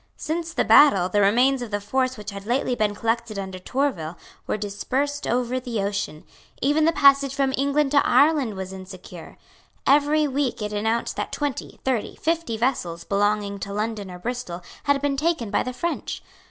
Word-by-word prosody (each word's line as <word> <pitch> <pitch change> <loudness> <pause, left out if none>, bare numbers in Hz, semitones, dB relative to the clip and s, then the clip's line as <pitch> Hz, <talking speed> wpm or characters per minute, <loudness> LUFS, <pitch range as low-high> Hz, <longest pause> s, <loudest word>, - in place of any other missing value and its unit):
Since 330 +1 -3
the - - +1
battle, 195 -12 +6
the 205 +2 +2
remains 250 +6 +3
of 240 - -5
the 205 0 -1
force 255 +5 -1
which 210 0 -7
had 200 +1 -9
lately 250 +1 +1
been 210 -3 0
collected 230 -1 -1
under 190 -1 -5
Tourville 185 - -2 0.3
were - - 0
dispersed 260 +8 -2
over 250 +1 0
the 245 -4 -4
ocean. 200 -6 -3 0.4
Even 295 +3 +2
the 330 - +4
passage 275 -3 +4
from 270 -1 +1
England 280 +1 +1
to 285 -1 +5
Ireland 285 -8 +3
was 190 0 -6
insecure. 185 -2 -10 0.5
Every 295 +2 +4
week 275 -2 -1
it 210 -1 -3
was 210 - -1
announced 225 +2 -1
that - - -3
twenty, 290 -4 -4
thirty, 255 -5 -1
fifty 325 -8 -1
vessels 180 -9 -1
belonging 205 0 0
to 200 - -5
London 210 -1 -3
or 180 - -8
Bristol 185 -4 -5 0.2
had 285 -1 +3
been 280 -1 +1
taken 295 -8 0
by - - +2
the 255 - -3
French. 335 +7 -4
240 Hz, 180 wpm, -24 LUFS, 205-280 Hz, 0.5 s, battle